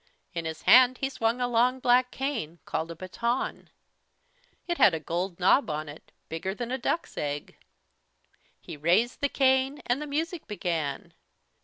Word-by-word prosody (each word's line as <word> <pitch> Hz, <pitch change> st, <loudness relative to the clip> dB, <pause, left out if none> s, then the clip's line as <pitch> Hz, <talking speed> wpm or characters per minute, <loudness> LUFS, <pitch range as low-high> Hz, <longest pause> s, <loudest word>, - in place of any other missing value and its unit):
In 170 Hz, -1 st, -4 dB
his 160 Hz, 0 st, -5 dB
hand 255 Hz, +1 st, +7 dB
he 270 Hz, 0 st, -2 dB
swung 230 Hz, -1 st, 0 dB
a 245 Hz, -, +1 dB
long 245 Hz, +2 st, +2 dB
black 250 Hz, 0 st, +3 dB
cane, 250 Hz, -, -3 dB
called 160 Hz, -, -3 dB
a 170 Hz, -, -6 dB
"baton." 235 Hz, +8 st, -3 dB, 1.0 s
It 345 Hz, -1 st, -2 dB
had 180 Hz, -, +6 dB
a -, -, -3 dB
gold 175 Hz, +4 st, -3 dB
knob 185 Hz, +5 st, +4 dB
on 155 Hz, 0 st, -3 dB
it, 145 Hz, +2 st, -12 dB, 0.2 s
bigger 185 Hz, +4 st, -4 dB
than 240 Hz, +1 st, -5 dB
a 260 Hz, -, -2 dB
duck's 330 Hz, +7 st, -2 dB
egg. 145 Hz, 0 st, -4 dB, 1.0 s
He -, -, -9 dB
raised 180 Hz, -, +2 dB
the 285 Hz, -, +2 dB
cane 265 Hz, +1 st, +2 dB
and 245 Hz, +4 st, 0 dB
the 300 Hz, -, -5 dB
music 320 Hz, +3 st, -3 dB
began! 170 Hz, -8 st, -3 dB
235 Hz, 165 wpm, -27 LUFS, 170-260 Hz, 1.0 s, hand